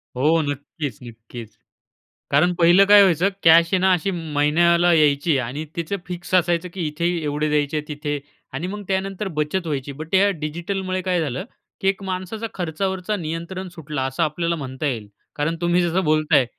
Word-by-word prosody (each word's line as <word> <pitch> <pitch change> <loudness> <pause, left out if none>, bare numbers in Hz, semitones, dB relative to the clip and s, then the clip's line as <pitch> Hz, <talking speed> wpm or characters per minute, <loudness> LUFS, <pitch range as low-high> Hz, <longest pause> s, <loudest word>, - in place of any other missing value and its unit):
हो 155 +5 +3
नक्कीच, 145 -3 -5
नक्कीच. 115 -1 -11 0.8
कारण 175 +6 +4
पहिलं 175 +4 +6
काय 205 0 +8
व्हायचं? 185 0 +4
कॅश 165 0 +7
आहे - - +5
ना 190 0 +4
अशी 190 +3 0
महिन्याला 170 +1 +2
यायची 150 -1 +3
आणि 130 +5 -3
तिचं 170 +4 -2
फिक्स 175 0 -7
असायचं 175 0 +1
की 180 -4 -3
इथे 155 +3 -3 0.2
एवढे 150 +1 -1
द्यायचे, 150 0 0
तिथे 145 -1 -3 0.3
आणि 165 +7 -3
मग 205 +2 -6
त्यानंतर 195 +1 -2
बचत 165 +4 -1
व्हायची. 140 -2 -3
बट 155 +5 -9
या 200 +2 +5
डिजिटलमुळे 185 +4 -3
काय 180 -1 0
झालं? 145 - -3 0.4
की 195 - 0
एक 195 0 0
माणसाचा 190 +4 -4
खर्चावरचा 190 +3 -2
नियंत्रण 170 +3 -5
सुटला 150 -4 -4
असं 135 +5 -1
आपल्याला 170 +2 -1
म्हणता 135 0 -5
येईल. 110 -6 -3 0.3
कारण 150 +3 -1
तुम्ही 175 +1 +2
जसं 175 +2 0
बोलताय 155 -3 +3
165 Hz, 165 wpm, -22 LUFS, 150-185 Hz, 0.8 s, काय